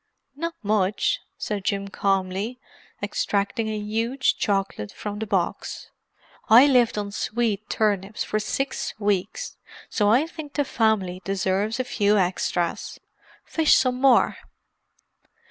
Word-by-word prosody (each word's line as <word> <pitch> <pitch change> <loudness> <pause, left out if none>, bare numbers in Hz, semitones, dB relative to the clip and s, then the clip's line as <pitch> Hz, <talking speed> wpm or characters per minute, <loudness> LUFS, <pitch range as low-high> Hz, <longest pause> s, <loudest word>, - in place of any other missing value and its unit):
"Not 335 +3 -4
much," 210 - +1 0.2
said 205 -2 -3
Jim 200 0 -1
calmly, 195 +4 -1 0.5
extracting 215 +3 -1
a 215 - -2
huge 225 +5 0
chocolate 195 - -1
from 210 0 -6
the 220 - -3
box. 190 -4 -2 0.6
"I 235 +5 +9
lived 250 -6 +3
on 205 -1 -3
swede 220 -1 -1
turnips 205 -1 0
for 215 - -1
six 270 +6 -2
weeks, 200 -2 -1 0.3
so 205 -3 +2
I 250 +8 +4
think 315 -3 -9
the 290 - 0
family 210 -7 +1
deserves 195 +4 0
a - - +2
few 210 -4 +2
extras. 180 -2 -1 0.5
Fish 320 -2 +4
some 255 -1 +1
more." 270 -2 +4
210 Hz, 125 wpm, -24 LUFS, 195-240 Hz, 0.6 s, I